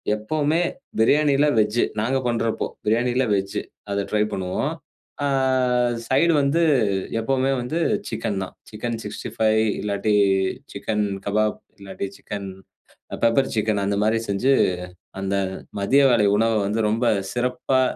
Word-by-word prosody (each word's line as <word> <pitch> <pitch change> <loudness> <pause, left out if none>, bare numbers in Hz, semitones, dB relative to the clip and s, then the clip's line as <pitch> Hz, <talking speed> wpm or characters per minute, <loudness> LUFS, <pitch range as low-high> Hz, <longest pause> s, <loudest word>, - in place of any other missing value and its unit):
எப்பவுமே 150 +9 0 0.4
பிரியாணியில 145 +4 +4
வெஜ்ஜு 105 +2 +2 0.2
நாங்க 130 +4 +1
பண்றப்போ, 115 -1 -1 0.2
பிரியாணியில 120 +4 +2
வெஜ்ஜு 100 0 -2 0.3
அத 100 0 -1
ட்ரை 105 0 +2
பண்ணுவோம். 90 -1 -2 0.5
ஆ, - - +2 0.8
சைடு 165 +5 +3
வந்து 140 +5 +2 0.6
எப்போமே 135 +3 +1
வந்து 155 +8 -2 0.3
சிக்கன் 100 -2 -2
தான். - - -8 0.2
சிக்கன் 115 +2 -4
65 110 +1 0 0.2
இல்லாட்டி, 105 +1 0 0.6
சிக்கன் 105 -1 -1 0.2
கபாப், 105 +1 0 0.2
இல்லாட்டி 100 0 -5
சிக்கன் 100 -2 -6 0.7
பெப்பர் 115 +4 +3
சிக்கன் 105 -2 0
அந்த 100 0 0
மாரி 110 +1 +2
செஞ்சு, 125 +8 +2 0.7
அந்த 95 0 -1 0.5
மதிய 135 +8 +4
வேளை 110 -4 +4
உணவ 115 +1 +2
வந்து 110 +3 0
ரொம்ப 115 +3 0 0.3
சிறப்பா 125 +1 0
110 Hz, 120 wpm, -23 LUFS, 105-130 Hz, 0.8 s, பிரியாணியில